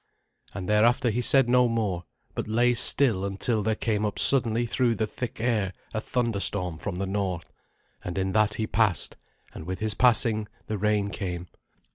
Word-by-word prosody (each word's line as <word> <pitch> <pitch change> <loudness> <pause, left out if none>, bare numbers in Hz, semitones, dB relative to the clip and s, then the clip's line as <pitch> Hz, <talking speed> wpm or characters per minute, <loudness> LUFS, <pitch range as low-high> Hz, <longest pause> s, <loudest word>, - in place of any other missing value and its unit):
And 90 - -6
thereafter 115 +3 +2
he 120 +4 -2
said 135 +1 +4
no 125 0 +3
more, 105 -7 -2 0.3
but - - -5
lay 120 +3 +2
still 115 -4 +4
until 100 +3 -2
there 110 +2 -1
came 105 -1 -2
up 105 -1 -3
suddenly 120 -3 +4
through 120 0 0
the 110 - -1
thick 115 +2 -7
air 110 -5 -1 0.2
a 110 - -3
thunderstorm 100 -8 -2
from 95 - -5
the 95 +2 -3
north; 95 -3 -4 0.5
and 90 0 -6
in 95 0 -1
that 105 +1 +1
he 110 - -2
passed, 105 -7 0 0.4
and 80 - -10
with 95 0 -4
his 110 -1 0
passing 115 -2 +3 0.2
the 110 -1 -5
rain 105 -1 0
came. 90 -4 -6
110 Hz, 175 wpm, -25 LUFS, 95-115 Hz, 0.5 s, said